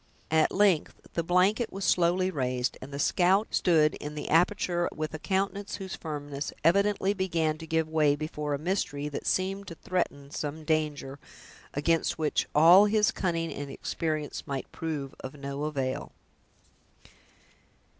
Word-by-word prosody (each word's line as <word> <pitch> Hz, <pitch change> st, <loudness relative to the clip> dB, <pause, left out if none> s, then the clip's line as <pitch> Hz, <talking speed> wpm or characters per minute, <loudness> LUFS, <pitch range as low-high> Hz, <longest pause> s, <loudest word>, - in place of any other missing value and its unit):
At 160 Hz, -1 st, +4 dB
length, 195 Hz, -6 st, +2 dB, 0.2 s
the 170 Hz, -, 0 dB
blanket 185 Hz, +7 st, +2 dB
was 195 Hz, 0 st, -4 dB
slowly 180 Hz, +2 st, +2 dB
raised, 125 Hz, -5 st, -1 dB
and 130 Hz, -, -9 dB
the 140 Hz, -, -5 dB
scout 190 Hz, +7 st, +3 dB
stood 155 Hz, -3 st, +3 dB
in 150 Hz, +1 st, -7 dB
the 150 Hz, -, -5 dB
aperture 175 Hz, +1 st, +2 dB
with 155 Hz, 0 st, -4 dB
a 155 Hz, -, -5 dB
countenance 195 Hz, +2 st, -1 dB
whose 190 Hz, -1 st, -6 dB
firmness 145 Hz, -2 st, -5 dB
evidently 200 Hz, +3 st, +3 dB
began 165 Hz, -5 st, 0 dB
to 160 Hz, -, -8 dB
give 160 Hz, 0 st, +1 dB
way 155 Hz, -2 st, +3 dB
before 150 Hz, -1 st, -3 dB
a -, -, -3 dB
mystery 150 Hz, -3 st, -2 dB
that 145 Hz, -, -5 dB
seemed 195 Hz, +1 st, 0 dB
to 170 Hz, -, -7 dB
threaten 145 Hz, -6 st, -3 dB
some 150 Hz, +2 st, -4 dB
danger, 150 Hz, -3 st, -1 dB, 0.6 s
against 165 Hz, +3 st, +1 dB
which 155 Hz, -2 st, 0 dB
all 170 Hz, +6 st, +8 dB
his 210 Hz, +1 st, +3 dB
cunning 165 Hz, -5 st, -1 dB
and 145 Hz, -1 st, -6 dB
experience 155 Hz, +1 st, -3 dB
might 135 Hz, -1 st, -4 dB
prove 150 Hz, -4 st, -4 dB
of 130 Hz, +2 st, -7 dB
no 140 Hz, +1 st, -4 dB
avail. 135 Hz, -4 st, -3 dB
160 Hz, 150 wpm, -28 LUFS, 145-185 Hz, 0.6 s, all